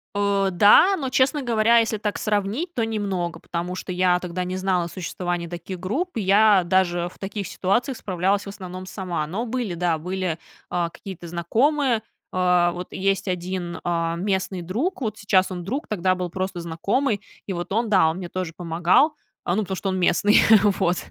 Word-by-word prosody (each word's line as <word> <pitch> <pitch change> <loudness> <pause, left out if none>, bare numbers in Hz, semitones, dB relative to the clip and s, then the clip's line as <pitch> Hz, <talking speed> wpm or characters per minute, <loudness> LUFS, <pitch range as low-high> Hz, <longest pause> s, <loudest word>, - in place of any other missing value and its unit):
Э, 200 -1 +2
да, 210 - +6
но, 270 -5 -3
честно 270 +3 +2
говоря, 235 -1 +4
если 225 -1 0
так 210 0 -2
сравнить, 210 - -1
то 230 -6 0
немного, 195 -7 -2
потому 175 +2 -4
что 185 - -6
я 180 0 +2
тогда 180 0 -4
не 185 +1 -3
знала 185 -2 0
о - - -4
существовании 175 -1 -4
таких 175 +2 -7
групп, 270 - -2
я 205 -1 +5
даже 175 -1 +1
в - - -20
таких 200 0 -4
ситуациях 240 +7 0
справлялась, 190 +2 0
в - - -6
основном, 185 -2 -8
сама. 185 -5 -3
Но 200 +9 -3
были, 240 -5 -2
да, 170 -1 0
были, 180 0 -3 0.3
а, 175 -1 -1
какие-то 175 -1 -9
знакомые. 235 - +1 0.3
А, 180 -1 +3
вот 180 +1 -6
есть 195 +1 0
1, 180 -1 -3
а, 165 -1 0
местный 190 0 -1
друг, 240 - -2
вот 215 -3 -2
сейчас 190 -2 +2
он 180 -1 -5
друг, 260 - -3
тогда 185 -3 +1
был 180 -1 -3
просто 185 0 -3
знакомый, 200 +8 -1 0.2
и 195 - -3
вот 175 +1 -5
он, 225 +2 0
да, 185 -6 +5
он 160 - -3
мне 185 -2 -5
тоже 185 -2 -4
помогал, 175 - +2 0.4
ну 190 +5 +2
потому 190 -2 -4
что 195 - -4
он 185 - -1
местный. 185 +3 +4 0.4
Вот. 175 +1 +2
185 Hz, 185 wpm, -23 LUFS, 175-210 Hz, 0.4 s, да